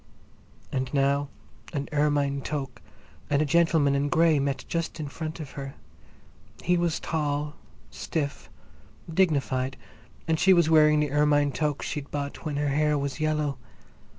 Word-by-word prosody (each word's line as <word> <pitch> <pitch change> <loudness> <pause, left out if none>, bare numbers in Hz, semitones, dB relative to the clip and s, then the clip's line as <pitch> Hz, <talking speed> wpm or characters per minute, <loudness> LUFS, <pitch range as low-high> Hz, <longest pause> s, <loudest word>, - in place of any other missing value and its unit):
And 130 -1 -2
now 140 +1 +2 0.4
an 140 -2 -2
ermine 145 -2 +1
toque 135 -5 -4 0.5
and 140 - +2
a 155 - +2
gentleman 160 -2 +3
in 140 +1 +1
grey 160 -1 +4
met 140 0 -2
just 170 0 -3
in 150 - -3
front 160 +3 -6
of 150 -4 -7
her. 135 -1 -7 0.9
He 180 - +3
was 170 -2 0
tall, 150 -1 -2 0.4
stiff, 145 -4 -4 0.6
dignified, 135 -7 +1 0.5
and 160 -1 +1
she 190 - +6
was 170 -3 +3
wearing 150 -1 +6
the 150 -2 -1
ermine 145 -1 +3
toque 150 +1 -1
she'd 145 -1 -4
bought 140 -1 -4
when 155 -3 -3
her 145 0 0
hair 150 +1 +2
was 140 0 -3
yellow. 150 -3 0
145 Hz, 150 wpm, -27 LUFS, 140-155 Hz, 0.9 s, she